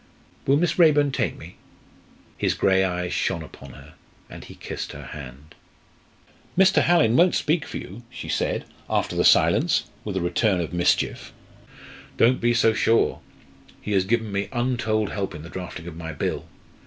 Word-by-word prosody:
"Will 140 +1 +4
Miss 170 +2 0
Raeburn 145 -4 +5
take - - -1
me?" - - -12 0.8
His - - 0
grey 95 0 +3
eyes 90 -1 -2
shone 85 -4 -1
upon 70 -4 -13
her, 70 +3 -14 0.4
and - - -9
he - - -12
kissed - - -6
her 70 - -9
hand. 70 +2 -10 1.0
"Mr. 190 +1 +5
Hallin 165 -10 +3
won't 175 +4 +4
speak 155 0 0
for - - -5
you!" 100 +6 -9
she 125 - -8
said, - - -1 0.2
after - - -1
the - - +2
silence, - - +3
with 100 -3 -3
a - - -1
return 90 +3 +1
of 85 0 -4
mischief. 85 0 0 0.9
"Don't 125 +3 +3
be 120 0 +3
so 115 -1 +4
sure! 115 +1 +2 0.6
He 105 - -6
has 95 -2 +3
given 110 +1 0
me 100 0 -2
untold 120 -4 0
help 95 -4 -4
in 75 - -9
the 85 - -10
drafting 90 -2 -7
of 85 -2 -8
my 80 -1 -6
Bill. 75 - -3
100 Hz, 170 wpm, -24 LUFS, 85-125 Hz, 1.0 s, Raeburn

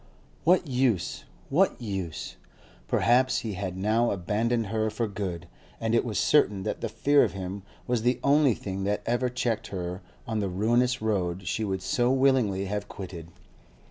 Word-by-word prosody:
What 175 +1 +4
use? 125 - 0 0.3
what 185 +7 +3
use? 95 -8 -4 0.5
Perhaps 130 +2 +3
he 110 -4 -4
had 95 -1 -4
now 110 +5 +2
abandoned 110 +5 0
her 110 +1 0
for 110 +2 -2
good, 95 -4 -5 0.3
and 115 0 -1
it 115 - +4
was 110 -4 -3
certain 105 -10 +3
that 105 - -3
the - - -2
fear 145 0 +4
of 100 - -1
him 95 +1 -5 0.2
was 120 -2 0
the 125 +2 +1
only 140 -4 +4
thing 95 -1 -5
that 105 +1 -1
ever 120 +2 +1
checked 120 -3 -1
her 90 0 -5 0.2
on 110 -2 -2
the 100 -2 -1
ruinous 120 +6 +1
road 95 -4 -1
she 110 +5 -1
would 95 -3 -2
so 125 -1 +2
willingly 130 -8 +2
have 105 +1 -3
quitted. 90 -4 -8
110 Hz, 170 wpm, -27 LUFS, 95-125 Hz, 0.5 s, What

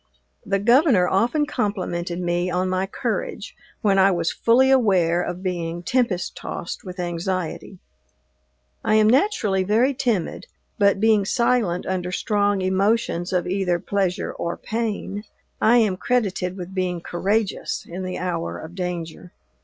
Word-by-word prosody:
The 195 - 0
Governor 235 - +4
often 240 - +2
complimented 180 -8 -2
me 175 0 0
on 180 +1 0
my 185 +1 0
courage, - - -4 0.3
when 200 -4 +3
I 190 +1 +6
was 170 -3 0
fully 260 +3 +3
aware 185 -9 +3
of 180 +1 -5
being 175 -2 -3
tempest 230 -6 0
tossed 170 - -6
with 180 0 -8
anxiety. 180 +1 -3 1.1
I 215 - +2
am 215 0 +5
naturally 220 - +2
very 225 +8 +2
timid, 240 - -2 0.3
but, 200 -1 +4
being 215 -1 +4
silent 220 -4 +1
under 180 -1 -2
strong 205 0 +1
emotions 190 -2 +1
of 180 -2 0
either 180 -1 0
pleasure 190 +1 -1
or 170 - -4
pain, 215 -2 -3 0.4
I 235 +3 +5
am 210 -6 +2
credited 195 -6 -1
with 180 0 -7
being 180 -2 -2
courageous 200 +5 -1
in 180 +2 -6
the 185 0 -4
hour 175 -2 -3
of 160 +2 -9
danger. 175 -2 -5
190 Hz, 140 wpm, -23 LUFS, 180-215 Hz, 1.1 s, I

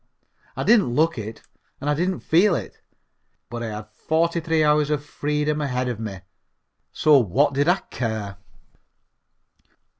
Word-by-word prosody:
I - - -1
didn't 200 - +4
look 160 -3 +2
it, 110 +1 -7 0.4
and 145 - -5
I 150 - +3
didn't 180 +4 -1
feel 175 +3 +3
it, - - -6 0.7
but 120 0 -5
I 115 - -3
had 105 0 -6
forty 170 +2 0
three 160 -1 +1
hours 150 -1 +3
of 145 -1 -1
freedom 150 +1 -1
ahead 125 -3 -1
of 120 -3 -3
me, 100 -4 -6 0.7
so 150 -2 +5
what 130 +7 +2
did 140 +3 +1
I 180 +2 +3
care? 110 -5 -3
145 Hz, 150 wpm, -23 LUFS, 120-160 Hz, 0.7 s, so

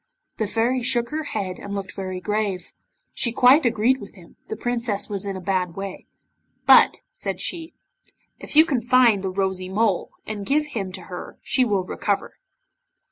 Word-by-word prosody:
The 215 - -1
Fairy 235 +4 +1
shook 240 -1 +1
her 310 0 -3
head, 195 -8 -4
and 200 0 -6
looked 195 -1 -5
very 185 -1 -5
grave. 200 -2 -2 0.4
She 235 - -1
quite 255 +4 +5
agreed 240 +3 +2
with 205 - -11
him, 175 -4 -16
the - - -4
Princess 235 -3 -1
was 200 -1 -2
in 195 -1 -3
a - - -6
bad 180 -2 -1
way 195 -1 -7 0.6
'But,' - - +6
said - - -4
she, 330 -1 -2 0.6
'if - - -7
you 315 +1 +8
can 270 -7 0
find 240 -4 +4
the 190 - -2
Rosy 190 -1 -2
Mole, 205 -1 +1 0.2
and 210 -2 -4
give 295 +7 +1
him 210 -10 -4
to 190 - -5
her 180 -1 -9
she 260 - +2
will 205 -6 +1
recover. - - -3
210 Hz, 180 wpm, -23 LUFS, 190-245 Hz, 0.6 s, you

